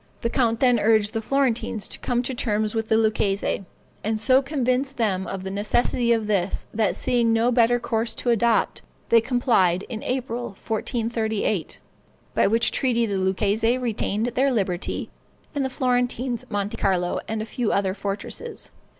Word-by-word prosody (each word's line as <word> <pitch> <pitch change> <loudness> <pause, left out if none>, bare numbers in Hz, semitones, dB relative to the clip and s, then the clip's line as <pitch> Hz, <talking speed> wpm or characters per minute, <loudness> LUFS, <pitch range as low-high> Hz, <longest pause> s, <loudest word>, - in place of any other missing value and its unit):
The 235 - -1
count 230 -4 +1
then 245 -3 +4
urged 215 -1 +3
the 225 - -1
Florentines 240 -4 0
to - - -4
come 245 0 0
to 260 - -2
terms 215 -4 0
with 225 -1 -1
the 220 - +4
Lucchese, 205 -3 0 0.4
and 220 +1 -1
so 255 +5 +4
convinced 270 -1 -1
them 195 -5 0
of 190 -1 -5
the 190 - -4
necessity 235 +4 +1
of 225 -2 +2
this, 200 -3 -1
that 215 -2 +1
seeing 235 -2 +1
no 225 +2 +3
better 245 0 +4
course 230 0 -1
to 245 - 0
adopt, 230 0 +2 0.3
they 230 -1 +6
complied 225 -7 +2
in 225 -3 -5
April, 245 -2 -2
1438, 220 - -2 0.6
by - - +3
which 230 +3 +2
treaty 240 -3 +1
the 200 -3 -1
Lucchese 205 +5 +1
retained 225 -3 -1
their 260 +3 +2
liberty, 190 -6 -2 0.4
and 285 -2 -1
the 265 - -1
Florentines 250 -1 -1
Monte 205 -1 -2
Carlo 180 -2 +1
and 220 0 -2
a - - -6
few 230 0 -2
other 195 -1 +1
fortresses. 200 - -5
225 Hz, 165 wpm, -24 LUFS, 210-245 Hz, 0.6 s, they